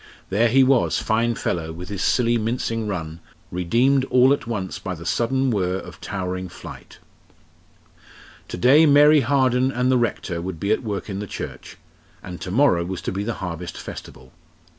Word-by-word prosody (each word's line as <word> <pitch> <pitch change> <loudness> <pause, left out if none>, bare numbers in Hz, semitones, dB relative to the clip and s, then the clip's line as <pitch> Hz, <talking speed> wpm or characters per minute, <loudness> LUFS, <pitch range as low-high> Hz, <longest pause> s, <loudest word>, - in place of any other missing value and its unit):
There 110 +5 +3
he 130 +3 +4
was, 130 -1 +2
fine 115 +1 0
fellow, 80 -5 -3
with 90 +2 -9
his 100 -1 -4
silly, 120 -1 +2
mincing 115 -1 -2
run, 80 -5 -5 0.3
redeemed 120 +10 +2
all 130 +1 +4
at 140 - -4
once 100 -6 -4
by 95 -2 -5
the 85 0 -11
sudden 130 +5 0
whirr 95 -3 0
of - - -10
towering 95 -1 -4
flight. - - -12 1.5
To - - -6
day 145 - +5
Mary 145 +1 +6
Harden 130 0 +2
and 125 0 0
the 130 - +3
Rector 95 -7 -2
would 90 -2 -6
be 100 +4 -1
at 110 - +2
work 105 -5 -4
in 100 -2 -5
the 105 - -5
church, - - -8 0.5
and 90 -1 -8
to - - -5
morrow 100 -5 +3
was 90 +1 -5
to - - -3
be 100 +2 -3
the 115 +1 -3
Harvest 85 0 -6
Festival. 65 +1 -10
110 Hz, 180 wpm, -22 LUFS, 90-125 Hz, 1.5 s, Mary